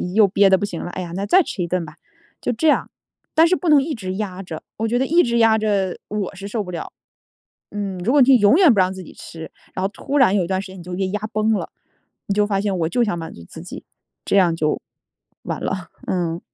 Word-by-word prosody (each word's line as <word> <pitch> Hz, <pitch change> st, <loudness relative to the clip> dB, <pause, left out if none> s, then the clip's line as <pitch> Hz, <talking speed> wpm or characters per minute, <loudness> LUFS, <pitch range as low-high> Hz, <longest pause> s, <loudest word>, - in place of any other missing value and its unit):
又 215 Hz, -2 st, +6 dB
憋 195 Hz, +1 st, +4 dB
得 -, -, +8 dB
不 -, -, -4 dB
行 180 Hz, -5 st, -6 dB
了， 175 Hz, -, -5 dB
哎 185 Hz, -, -5 dB
呀， 170 Hz, -2 st, -6 dB
那 195 Hz, +2 st, -2 dB
再 370 Hz, -, +5 dB
吃 195 Hz, -, -4 dB
一 -, -, -3 dB
顿 180 Hz, 0 st, -1 dB
吧， 150 Hz, -1 st, -11 dB, 0.4 s
就 -, -, -1 dB
这 245 Hz, +7 st, 0 dB
样。 300 Hz, -, +2 dB, 0.4 s
但 325 Hz, +1 st, +6 dB
是 365 Hz, -, +3 dB
不 355 Hz, -, -2 dB
能 295 Hz, -2 st, +6 dB
一 300 Hz, +2 st, -3 dB
直 185 Hz, -5 st, -5 dB
压 195 Hz, -2 st, -4 dB
着， 165 Hz, -4 st, -7 dB, 0.2 s
我 225 Hz, -, -1 dB
觉 240 Hz, +2 st, +1 dB
得 265 Hz, -, +1 dB
一 340 Hz, +3 st, +4 dB
直 235 Hz, -1 st, +1 dB
压 225 Hz, -1 st, +5 dB
着 200 Hz, -4 st, 0 dB
我 205 Hz, -2 st, -3 dB
是 195 Hz, +1 st, -7 dB
受 210 Hz, +1 st, -2 dB
不 180 Hz, -, -10 dB
了。 170 Hz, -, -6 dB, 0.8 s
嗯， 200 Hz, -2 st, -4 dB
如 190 Hz, +7 st, 0 dB
果 290 Hz, +1 st, +5 dB
你 250 Hz, -, +6 dB
就 270 Hz, -, +7 dB
永 205 Hz, -3 st, +5 dB
远 355 Hz, -4 st, +6 dB
不 200 Hz, -, +1 dB
让 185 Hz, 0 st, +3 dB
自 190 Hz, -1 st, -8 dB
己 -, -, -12 dB
吃， 160 Hz, -1 st, -10 dB, 0.2 s
然 185 Hz, -, -3 dB
后 -, -, +2 dB
突 280 Hz, +6 st, -3 dB
然 230 Hz, -7 st, +5 dB
有 195 Hz, -, +2 dB
一 -, -, -4 dB
段 190 Hz, +1 st, -1 dB
时 195 Hz, -, -9 dB
间 190 Hz, -, -11 dB
你 -, -, -10 dB
就 180 Hz, +1 st, -7 dB
给 190 Hz, +1 st, -1 dB
压 210 Hz, +2 st, -2 dB
崩 215 Hz, +1 st, +2 dB
了， 210 Hz, -, -2 dB, 0.6 s
你 200 Hz, -, 0 dB
就 210 Hz, 0 st, +3 dB
发 195 Hz, -2 st, 0 dB
现 200 Hz, -2 st, -1 dB
我 160 Hz, -, +1 dB
就 245 Hz, +6 st, +2 dB
想 210 Hz, -6 st, -1 dB
满 165 Hz, -, -7 dB
足 85 Hz, -, -12 dB
自 -, -, -11 dB
己， -, -, -9 dB, 0.4 s
这 -, -, +2 dB
样 175 Hz, -4 st, +4 dB
就 155 Hz, -2 st, 0 dB, 0.6 s
完 -, -, -4 dB
了。 185 Hz, -3 st, -3 dB, 0.2 s
嗯。 170 Hz, -2 st, -1 dB
200 Hz, 295 characters per minute, -21 LUFS, 185-225 Hz, 0.8 s, 得